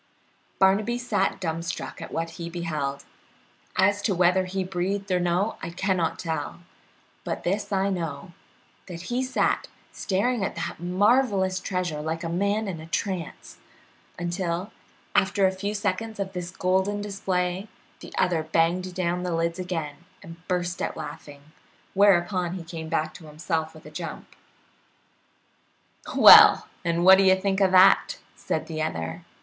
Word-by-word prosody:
Barnaby 200 +5 +3
sat 245 -5 -1
dumb 165 -2 -3
struck 170 +2 -6
at - - -8
what 165 0 -3
he 170 - -4
beheld; 155 -5 -4 0.7
as 205 +2 +3
to 205 -2 0
whether 180 +1 +3
he 190 +1 -2
breathed 190 +2 -3
or 180 - +2
no, 175 +4 0
I 165 - -5
cannot 180 -1 -1
tell; 160 -1 -4 0.6
but - - -4
this 195 +5 -2
I 195 0 +1
know, 175 +1 -5 0.5
that 180 +3 -8
he 250 - +1
sat 255 0 0 0.2
staring 210 +4 -1
at - - -3
that - - -5
marvelous 190 +1 +2
treasure 180 -5 -3
like 160 +3 -3
a 165 - -3
man 200 +5 0
in 170 -5 -5
a 160 - -10
trance, 175 0 -4 0.6
until, 175 +2 -3 0.4
after 195 -1 +3
a 190 - +3
few 200 +2 -4
seconds 210 +2 -2
of 195 -1 -3
this 180 -1 -5
golden 190 +2 0
display, 190 -1 -2 0.3
the - - -11
other 170 -3 +2
banged 170 +3 0
down 180 -1 -1
the 180 -2 -2
lids 170 +2 -1
again 165 -5 -4 0.3
and 165 0 -10
burst 175 -1 -2
out - - -3
laughing, 145 -2 -9 0.5
whereupon 180 -2 +3
he 180 - -6
came 165 -1 -7
back 155 0 -1
to 160 - -12
himself 160 +1 -3
with 155 - -15
a - - -11
jump. - - -7 1.8
"Well, - - +9 0.2
and 170 +1 0
what 190 0 +9
do - - +5
you 190 0 +5
think 195 0 0
of 190 - +5
that?" 185 +1 +5 0.2
said - - -3
the 155 -1 -5
other. 80 - -4
180 Hz, 155 wpm, -25 LUFS, 170-195 Hz, 1.8 s, Well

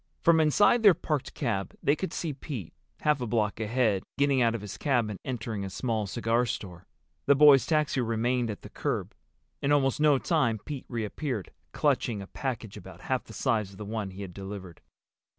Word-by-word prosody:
From 165 -1 +5
inside 205 +9 +4
their 205 -5 +7
parked 150 -4 -3
cab 100 - -2
they 145 - +4
could 190 - -4
see 160 -4 -3
Pete, 130 - -7 0.3
half 150 -3 +2
a 120 - -2
block 105 -2 0
ahead, 110 -3 +1 0.2
getting 140 -2 +3
out 115 -1 +3
of 115 - -4
his 105 -2 -7
cab 120 -7 +1
and 100 - -7
entering 115 -5 -4
a 95 - -4
small 110 0 -2
cigar 120 +3 +1
store. 90 -4 -6 0.4
The 140 - +6
boy's 145 -2 +7
taxi 150 -4 +1
remained 120 +1 0
at 105 - -6
the - - -9
curb. - - -2 0.5
In 140 - +1
almost 135 -2 +3
no 150 -2 +5
time 130 -7 +1
Pete 140 +5 -7
reappeared, 115 - -3 0.2
clutching 110 -4 +1
a 100 - -6
package 115 -2 -5
about 100 - -11
half - - -2
the - - -12
size 105 -4 0
of - - -14
the 105 - -7
one 105 -1 -3
he 95 +2 -8
had 90 -2 -8
delivered. 95 -3 -8
120 Hz, 195 wpm, -28 LUFS, 105-140 Hz, 0.5 s, their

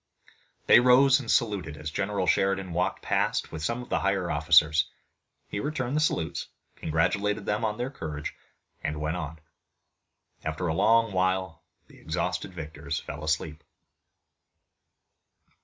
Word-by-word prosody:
They - - +8
rose 130 +2 +6
and 125 - -8
saluted 95 -10 +1
as 75 +1 -5
General 95 +2 -1
Sheridan 95 -1 +1
walked 90 +2 -1
past - - 0
with 80 -1 -6
some 115 +9 -1
of - - -14
the - - +1
higher 100 -3 0
officers. 80 0 +4 0.6
He 100 - -4
returned 140 -1 -2
the - - +3
salutes, 85 - -1 0.3
congratulated 100 +6 0
them 105 +2 -1
on 105 -1 -1
their 125 +2 -3
courage 75 - -5 0.5
and 75 0 -2
went 75 +3 -2
on. 80 -1 -5 1.1
After 80 +3 -3
a 80 - 0
long 115 +5 +4
while 95 -2 0 0.2
the - - -18
exhausted - - -2
victors 80 -2 -5
fell 75 +2 -8
asleep. 80 0 -2
90 Hz, 140 wpm, -27 LUFS, 80-110 Hz, 1.1 s, They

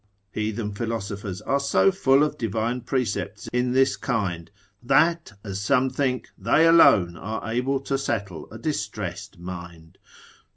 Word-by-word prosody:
Heathen 105 0 -3
philosophers 100 -3 -4
arc 140 +1 0
so 140 +7 +3
full 140 -7 +3
of 150 - -1
divine 115 +2 -2
precepts 120 -4 -2
in 125 0 +1
this 130 +1 +3
kind, 95 - -2 0.3
that, 150 +3 +2
as 100 -2 -5
some 130 +4 +2
think, 130 -3 -1
they 115 +11 +3
alone 100 - +6
are 110 +6 -5
able 125 +4 0
to 135 0 -2
settle 100 - -4
a 110 - -8
distressed 105 - -4
mind. 85 -2 -9
115 Hz, 135 wpm, -24 LUFS, 100-135 Hz, 0.3 s, alone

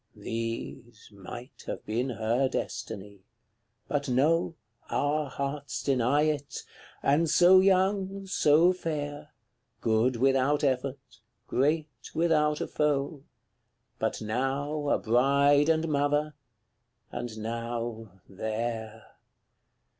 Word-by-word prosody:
These 115 0 -6
might 110 +6 -10
have - - -5
been 120 +5 -1
her 120 +3 0
destiny; 100 -5 -5 0.7
but 145 -1 -1
no, 160 +7 +2 0.3
Our 145 0 0
hearts 140 -1 -4
deny 135 +2 +2
it: 150 -2 -2 0.4
and 155 +4 +3
so 180 +3 +7
young, 195 +1 +2
so 170 -1 +4
fair, 150 -4 -4 0.5
Good 115 +3 +2
without 135 +4 +2
effort, 135 0 -2 0.3
great 145 -3 -1
without 150 -2 +2
a - - -2
foe; 145 -1 0 0.8
But - - -2
now 140 +6 -1
a - - +3
bride 140 +5 +3
and 160 0 +2
mother 145 +1 +1 0.8
and 120 -2 -5
now 115 -3 -5
THERE! 110 +2 -4
140 Hz, 100 wpm, -28 LUFS, 115-150 Hz, 0.8 s, so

